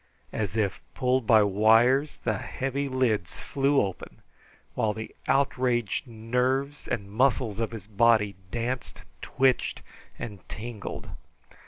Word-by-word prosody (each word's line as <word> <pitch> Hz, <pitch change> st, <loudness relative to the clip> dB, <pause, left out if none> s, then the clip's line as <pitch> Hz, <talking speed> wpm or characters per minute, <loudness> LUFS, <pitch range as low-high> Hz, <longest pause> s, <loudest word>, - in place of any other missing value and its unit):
As 105 Hz, -2 st, -2 dB
if 105 Hz, -3 st, 0 dB
pulled 125 Hz, -2 st, +1 dB
by 110 Hz, -2 st, +7 dB
wires, 115 Hz, +8 st, +4 dB
the 110 Hz, -4 st, 0 dB
heavy 135 Hz, +1 st, -3 dB
lids 115 Hz, -9 st, 0 dB
flew 140 Hz, 0 st, +1 dB
open, 95 Hz, -2 st, -4 dB, 0.5 s
while 110 Hz, -1 st, +1 dB
the 110 Hz, +1 st, -7 dB
outraged 125 Hz, -5 st, +1 dB
nerves 125 Hz, +5 st, -1 dB
and 100 Hz, -3 st, -3 dB
muscles 115 Hz, -2 st, +1 dB
of 115 Hz, -, 0 dB
his 110 Hz, -5 st, -8 dB
body 105 Hz, -1 st, +3 dB
danced, 120 Hz, +3 st, -4 dB, 0.2 s
twitched, 130 Hz, -1 st, +1 dB, 0.3 s
and 105 Hz, -4 st, -6 dB
tingled. 110 Hz, -1 st, -6 dB
115 Hz, 120 wpm, -27 LUFS, 105-130 Hz, 0.5 s, by